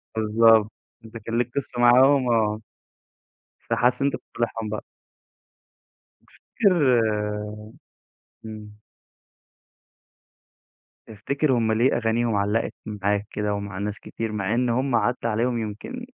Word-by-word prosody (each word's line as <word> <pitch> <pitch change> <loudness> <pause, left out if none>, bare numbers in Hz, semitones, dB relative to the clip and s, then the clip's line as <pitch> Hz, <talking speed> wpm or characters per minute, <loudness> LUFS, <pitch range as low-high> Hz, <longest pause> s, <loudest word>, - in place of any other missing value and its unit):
بالضبط، 110 0 +4 0.3
أنت 110 +1 -10
كان 115 +2 -4
ليك 120 0 0
قصة 130 -3 -4
معاهم 130 +2 +5
آه، 110 -2 +1 1.1
فحاسس 125 +2 +1
إن 140 - +3
أنت - - -1
بتصالحهم 115 -2 -4
بقى. 110 - -4 1.4
تفتكر 150 - +1 1.4
إمم. 105 -1 -10 2.3
تفتكر 140 +7 -2
هم 115 -3 +1
ليه 120 +4 +2
أغانيهم 115 -1 0
علّقت 105 +3 0
معاك 105 0 -2
كده 105 -1 -2
ومع 100 -1 -5
ناس 105 +1 -4
كتير، 115 -1 -5
مع 105 0 -2
إن 125 0 +1
هم 130 +1 0
عدى 120 +2 +1
عليهم 120 +2 0
يمْكن 110 - -6
115 Hz, 110 wpm, -24 LUFS, 105-125 Hz, 2.3 s, معاهم